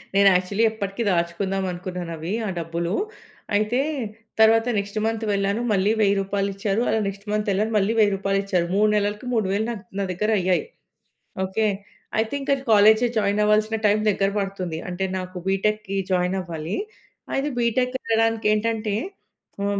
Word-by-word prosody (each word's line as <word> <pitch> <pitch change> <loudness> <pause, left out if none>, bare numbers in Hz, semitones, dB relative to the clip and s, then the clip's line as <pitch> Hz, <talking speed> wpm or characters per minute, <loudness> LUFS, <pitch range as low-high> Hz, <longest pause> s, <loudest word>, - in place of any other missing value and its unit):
నేను 200 0 +6
యాక్చువల్లి 185 +4 +1
ఎప్పటికి 205 +1 -3
దాచుకుందామనుకున్నానవి 180 -1 -2 0.2
ఆ - - -2
డబ్బులూ. 170 +2 -2 0.6
అయితే 215 +4 +1 0.6
తరువాత 225 +1 +5
నెక్స్ట్ 200 +1 -3
మంత్ 225 0 -1
వెళ్ళాను, 200 +3 0
మళ్ళి 195 +1 +3
1,000 200 -1 +4
రూపాయలిచ్చారు. 200 +2 -1
అలా 220 - +2
నెక్స్ట్ 200 +1 -6
మంతేళ్ళాను, 210 +1 0
మళ్ళి 205 +3 +2
1,000 205 -2 +4
రూపాయలిచ్చారు. 195 -2 0
3 210 +1 +4
నెలలకి 210 +3 -1
3,000 210 -1 +1
నా 235 - -2 0.2
నా - - +1
దగ్గరయ్యాయి. 185 -1 +1 0.8
ఓకే. 215 +3 0 0.5
అయితే 220 +3 0
ఇంక 275 - -1 0.2
కాలేజ్‌ 220 +2 +6
జాయిన్ 205 0 +2
అవ్వాల్సిన 215 +1 +2
టైం 210 +1 +4
దగ్గర 195 0 +1
పడుతుంది. 185 -4 -3
అంటే 185 +2 -2
నాకు 185 0 -6
బీటెక్‌కి 195 +1 0
జాయిన్ 180 +1 +1
అవ్వాలి. 165 -1 -5 0.6
అయితే 280 +2 0
బీటెక్ 250 +2 +1
వెళ్ళడానికి 225 -1 +1
ఏంటంటే 215 -1 -1 0.7
ఆహ్, 200 0 0
200 Hz, 135 wpm, -23 LUFS, 190-215 Hz, 0.8 s, నేను